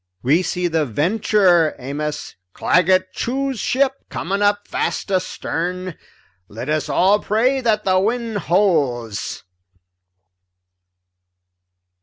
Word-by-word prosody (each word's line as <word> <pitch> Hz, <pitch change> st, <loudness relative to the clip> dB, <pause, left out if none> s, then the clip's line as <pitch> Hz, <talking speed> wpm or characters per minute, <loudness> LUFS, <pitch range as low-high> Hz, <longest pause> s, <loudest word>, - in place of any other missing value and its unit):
"We 150 Hz, +8 st, +3 dB
see 180 Hz, 0 st, -1 dB
the 160 Hz, -2 st, +1 dB
Venture, 175 Hz, -, +2 dB
Amos, 150 Hz, +3 st, -5 dB, 0.2 s
Claggett 185 Hz, +1 st, +2 dB
Chew's 270 Hz, 0 st, -2 dB
ship, 270 Hz, +5 st, 0 dB
coming 195 Hz, +4 st, -3 dB
up 205 Hz, 0 st, +1 dB
fast -, -, -2 dB
astern. 180 Hz, -1 st, -2 dB, 0.5 s
Let 115 Hz, +6 st, -7 dB
us 155 Hz, 0 st, -1 dB
all 195 Hz, +3 st, +3 dB
pray 250 Hz, +7 st, +1 dB
that 215 Hz, -3 st, +1 dB
the 185 Hz, -1 st, +3 dB
wind 225 Hz, +1 st, -1 dB
holds." 140 Hz, -, 0 dB
185 Hz, 100 wpm, -20 LUFS, 160-210 Hz, 0.5 s, We